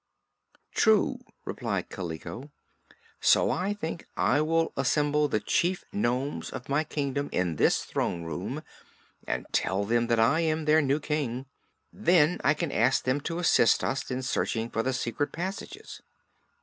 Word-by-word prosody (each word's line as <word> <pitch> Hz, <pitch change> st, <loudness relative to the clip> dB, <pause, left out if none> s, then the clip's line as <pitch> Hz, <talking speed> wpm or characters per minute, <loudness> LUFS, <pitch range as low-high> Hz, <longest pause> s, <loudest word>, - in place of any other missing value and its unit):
"True," -, -, +3 dB, 0.3 s
agreed -, -, -3 dB
Kaliko. 90 Hz, -, -6 dB, 0.7 s
"So -, -, +4 dB
I 200 Hz, +3 st, -1 dB
think 165 Hz, -4 st, -5 dB
I 145 Hz, -, +3 dB
will 165 Hz, +1 st, +1 dB
assemble 145 Hz, +3 st, +2 dB
the 110 Hz, -, 0 dB
chief 175 Hz, -, 0 dB
nomes 135 Hz, -7 st, -1 dB
of 130 Hz, -1 st, -7 dB
my 140 Hz, +3 st, +1 dB
kingdom 145 Hz, -2 st, -2 dB
in 85 Hz, -4 st, 0 dB
this -, -, +3 dB
throne 85 Hz, -1 st, -2 dB
room 80 Hz, -2 st, -4 dB, 0.6 s
and -, -, -2 dB
tell 95 Hz, +2 st, 0 dB
them 120 Hz, +2 st, +1 dB
that 115 Hz, -1 st, +2 dB
I 125 Hz, +9 st, +4 dB
am 160 Hz, -1 st, 0 dB
their 155 Hz, +1 st, +5 dB
new 140 Hz, +1 st, +1 dB
King. 140 Hz, -4 st, -2 dB, 0.5 s
Then 175 Hz, -4 st, +3 dB
I 145 Hz, +3 st, +4 dB
can 160 Hz, -1 st, -2 dB
ask 130 Hz, -, +2 dB
them 130 Hz, +3 st, 0 dB
to 165 Hz, +3 st, -3 dB
assist 170 Hz, -9 st, +4 dB
us 135 Hz, -, -2 dB
in 130 Hz, 0 st, -3 dB
searching 115 Hz, -2 st, -1 dB
for 115 Hz, -, 0 dB
the 130 Hz, -, 0 dB
secret 120 Hz, +4 st, -2 dB
passages. 195 Hz, -, -6 dB
145 Hz, 150 wpm, -28 LUFS, 120-160 Hz, 0.7 s, their